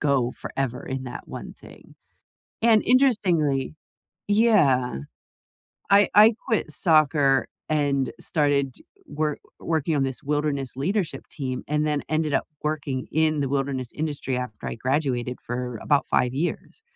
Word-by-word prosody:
go 135 -4 +2
forever 130 -2 -4
in 130 0 -4
that 125 -1 -8
one - - -8
thing, - - -16 0.7
and, 225 -2 +5
interestingly 180 - +2 0.5
Yeah. 155 - +3 0.9
I 200 +1 +6
I 215 +2 +8 0.2
quit 220 -9 0
soccer, 145 -5 +3 0.2
and 140 -3 +1
started 140 -4 +1 0.3
work 150 0 -2 0.2
working 160 -1 0
on 135 - +2
this 135 +2 -4
wilderness 145 -2 -1
leadership 175 +5 -2
team, 130 -3 -4
and 150 +1 +1
then 150 -1 0
ended 155 -1 0
up - - +1 0.2
working 145 -4 -2
in 155 0 +2
the 140 - 0
wilderness 135 -3 -2
industry 145 -4 -2
after 125 -4 -6
I - - -4
graduated 125 -1 -1
for 125 -1 -4
about 145 -2 +2
5 125 - +2
years. 175 - -4
145 Hz, 135 wpm, -24 LUFS, 130-155 Hz, 0.9 s, I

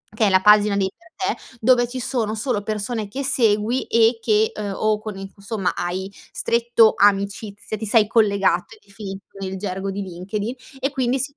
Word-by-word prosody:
che 215 -1 +3
è - - +3
la 190 -1 +5
pagina 210 0 +5
dei 190 -1 +1
per 335 -1 -4
te, 260 - -18
dove 245 +1 +4
ci 255 +1 -5
sono 230 -3 -2
solo 225 -1 -1
persone 215 +1 -3
che 265 +7 -4
segui 235 -2 +2
e 230 +1 +3
che 215 -1 +2
uhm, 205 -1 -4
o 215 0 +1
con 215 -2 -7
i 195 0 -7
cu 200 - -21
somma, 200 -2 -2
hai 185 +2 -3 0.2
stretto 235 -1 +3
amicizia 200 +1 +1
ti 220 - -5
sei 215 0 +4
collegato, 205 - +2
è - - -23
definito 195 -1 -8
nel 190 0 -4
gergo 190 0 -4
di 200 +1 -4
LinkedIn, 200 +6 -5 0.2
e 270 +1 0
quindi 260 -1 0
si 280 +2 -2
215 Hz, 195 wpm, -22 LUFS, 200-235 Hz, 0.2 s, la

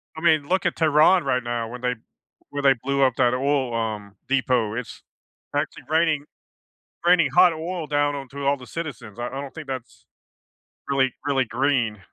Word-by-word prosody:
I 160 - -7
mean, 155 -4 +3
look 185 0 +1
at 175 - +1
Tehran 160 +3 +4
right 125 -1 0
now 120 -1 -3
when 125 +1 -8
they 125 0 0 0.5
where 145 - -4
they 140 -1 +6
blew 140 0 0
up 130 -2 +3
that 125 -2 +3
oil, 135 -2 0
um, 105 -3 -3
depot. 125 -5 +1
It's 125 0 -6 0.5
actually - - -2
raining 155 -2 +2 0.8
raining 175 -1 +5
hot 180 -1 +7
oil 165 +1 -4
down 145 0 +1
onto 140 0 -6
all 140 +1 +3
the 125 -2 -12
citizens. 125 -10 -7
I 120 - -3
I 135 +2 -5
don't 140 -1 -8
think 160 -3 -8
that's 130 -3 -7 0.8
really 135 -2 +2
really 135 -3 +2
green. 120 -3 0
135 Hz, 180 wpm, -24 LUFS, 125-155 Hz, 0.8 s, hot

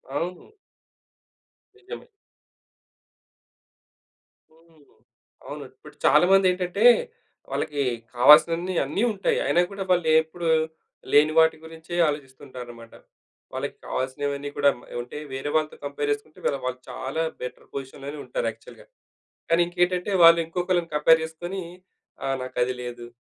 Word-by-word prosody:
అవును. 180 - -4 1.3
నిజమే. 410 +4 -10 2.5
హ్మ్. 165 -2 -24 0.6
అవును. - - -7
ఇప్పుడు - - -16
చాలా - - +6
మంది 195 -1 +5
ఏంటంటే 180 +3 -2 0.7
వాళ్ళకి 145 -2 -1 0.3
కావాల్సినవన్నీ 165 +7 +6
అన్నీ 150 - -1
ఉంటాయి. 200 -1 0
అయినా 175 - +3
కూడా 200 -1 -4
వాళ్ళెప్పుడు 160 -1 +2 0.6
లేని 150 +2 +5
వాటి 160 0 +5
గురించే 160 +1 -9
ఆలోచిస్తుంటారన్నమాట. 130 -5 -7 0.6
వాళ్లకి - - -4
కావాల్సినవన్నీ 140 +2 -3
కూడా 145 0 +5 0.3
ఉంటాయి. 150 +5 -8
వేరే 135 +2 -4
వాళ్ళతో 155 -1 0
కంపేర్ 145 +1 -2
చేసుకుంటే 145 +2 -5 0.3
వాళ్ళు 130 0 -3
చాలా 135 +5 -3 0.2
బెటర్ 125 - -7
పొజిషన్‌లోనే 140 +2 -7
ఉంటారు - - -2
యాక్చువల్‌గా. - - -16 0.7
కానీ 165 +1 +4
ఇంకేంటంటే 180 +2 0
వాళ్ళు 165 0 +9
ఇంకొకళ్ళని 175 0 -1
కంపేర్ 160 +2 +5
చేసుకొని 175 +4 -6 0.6
"ఆహ్, 135 0 0
నాకది 125 0 -1
లేదు. 120 -1 -7
155 Hz, 110 wpm, -25 LUFS, 140-175 Hz, 2.5 s, వాళ్ళు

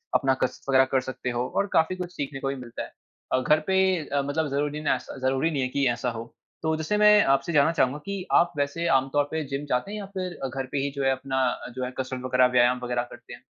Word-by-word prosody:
अपना 135 -1 +3
कसरत 130 +1 -3
वग़ैरह 130 0 +6
कर 130 - +3
सकते 125 - -5
हो, 120 +1 -1
और 200 - +2
काफ़ी 160 +3 +3
कुछ 180 -1 -6
सीखने 140 -1 -4
को 135 - -3
भी 135 - -1
मिलता 125 -3 -7
है। - - -10 0.4
अ, 130 - +4
घर 150 +4 +4
पे 190 - +2 0.3
अ, 140 0 0
मतलब 150 +2 -1
ज़रूरी 145 +2 -1
ना 150 - +2
स 135 - -10
ज़रूरी 135 +5 +1
नहीं 140 -4 -1
है 130 - +1
कि 140 0 +1
ऐसा 120 +1 -2
हो। 115 +1 -8 0.3
तो 160 0 +1
जैसे 160 +7 -1
मैं 210 0 +7
आपसे 140 +5 0
जानना 150 +2 +5
चाहूँगा 135 -2 +1
कि 200 -2 -4
आप 175 - +5
वैसे 145 +4 -1
आम 135 0 +2
तौर 145 0 +4
पे 160 0 -1
जिम 140 +1 -4
जाते 125 +11 0
हैं 215 - -4
या 200 - -6
फिर 185 -1 -4
घर 135 +1 -4
पे - - -2
ही 140 +1 -1
जो 140 - -2
है 135 - +3
अपना 130 0 -2
अ, - - -6
जो 130 -1 -2
है 125 - -5
कसरत 130 -1 -3
वग़ैरह, 125 0 +4
व्यायाम 125 +1 +4
वग़ैरह 120 0 -1
करते - - -12
हैं? - - -11
140 Hz, 265 wpm, -26 LUFS, 130-160 Hz, 0.4 s, मैं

